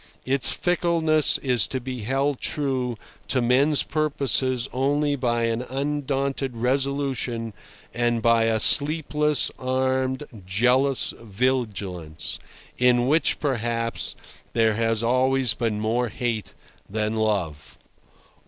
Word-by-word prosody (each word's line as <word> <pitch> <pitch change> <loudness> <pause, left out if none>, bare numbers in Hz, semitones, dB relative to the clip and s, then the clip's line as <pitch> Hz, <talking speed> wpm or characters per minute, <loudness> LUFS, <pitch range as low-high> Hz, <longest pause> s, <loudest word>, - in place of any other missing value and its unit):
Its 130 -2 +1
fickleness 165 -3 +2
is 125 -6 +2
to 130 - -3
be 130 0 -6
held 135 +4 -1
true 130 -5 -1 0.3
to 130 - +1
men's 135 +5 +3
purposes 135 -5 0
only 145 +3 +1
by 120 -3 0
an 115 0 0
undaunted 135 -1 -2
resolution 130 -2 -1 0.4
and 120 -1 0
by 115 0 +3
a 110 -1 +1
sleepless, 150 +2 +2
armed, 130 +1 -1 0.2
jealous 125 +8 +3
vigilance, 100 -8 -2 0.4
in 125 -1 +4
which, 155 +4 +2
perhaps, 115 -4 -1 0.4
there 115 -1 +3
has 115 0 0
always 130 0 +2
been 110 -1 -2
more 115 +3 0
hate 115 0 -3 0.3
than 110 +1 -2
love. 100 -9 -2
125 Hz, 105 wpm, -24 LUFS, 115-140 Hz, 0.4 s, in